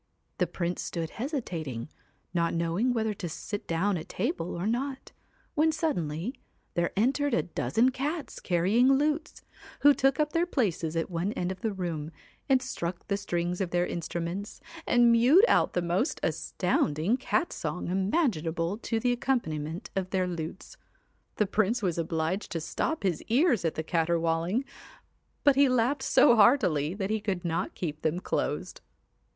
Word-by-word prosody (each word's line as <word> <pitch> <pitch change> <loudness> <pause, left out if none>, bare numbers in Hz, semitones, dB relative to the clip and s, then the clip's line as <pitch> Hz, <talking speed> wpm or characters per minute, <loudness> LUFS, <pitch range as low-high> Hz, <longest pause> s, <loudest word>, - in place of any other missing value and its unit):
The 180 - +2
Prince 175 +1 -3
stood 165 -2 -4
hesitating, 175 - -4 0.5
not 170 -1 +1
knowing 170 +9 +1
whether 220 -3 0
to 185 -4 -5
sit 205 +5 -6
down 180 +4 +1
at 155 - -10
table 245 - -2
or 170 +2 -3
not, 260 +4 -2 0.4
when 315 0 +3
suddenly 220 - -2 0.4
there 170 0 0
entered 270 +4 +2
a - - +1
dozen 200 - +1
cats 290 +4 -4
carrying 200 +10 +3
lutes, 300 +3 0 0.4
who 290 0 +8
took 270 0 +2
up 300 -1 +1
their 340 +1 +2
places 175 - -1
at 165 +3 -1
one 175 +5 -1
end 180 +1 -2
of 185 0 -7
the 220 - 0
room, 170 -6 -4 0.4
and 265 -1 +4
struck 175 -8 -4
the 200 - +2
strings 175 -2 -2
of 185 - -1
their 175 +1 +1
instruments, 170 +4 -4 0.3
and 240 -1 +5
mewed 255 - +6
out - - +3
the 180 - 0
most 175 - 0
astounding 155 +10 0
cat 335 +6 -1
song 180 - -4
imaginable 190 - 0
to 225 -1 -1
the 245 +2 +1
accompaniment 170 - -2
of 190 -1 -1
their 185 -1 +1
lutes. 170 0 -6 0.6
The 210 - +2
Prince 220 +3 +1
was 175 -3 0
obliged 165 +4 -2
to 165 - -1
stop 300 - -2
his 180 -5 0
ears 250 - +3
at 165 - 0
the 160 - -2
caterwauling, 170 - 0 0.8
but 285 -2 +5
he 280 0 +5
laughed 255 +3 +2
so 240 - +5
heartily 190 - +4
that 200 0 -2
he 220 - +1
could 190 -4 -2
not 165 -1 -2
keep 155 -3 -4
them 160 +2 0
closed. - - -3
190 Hz, 160 wpm, -28 LUFS, 170-250 Hz, 0.8 s, who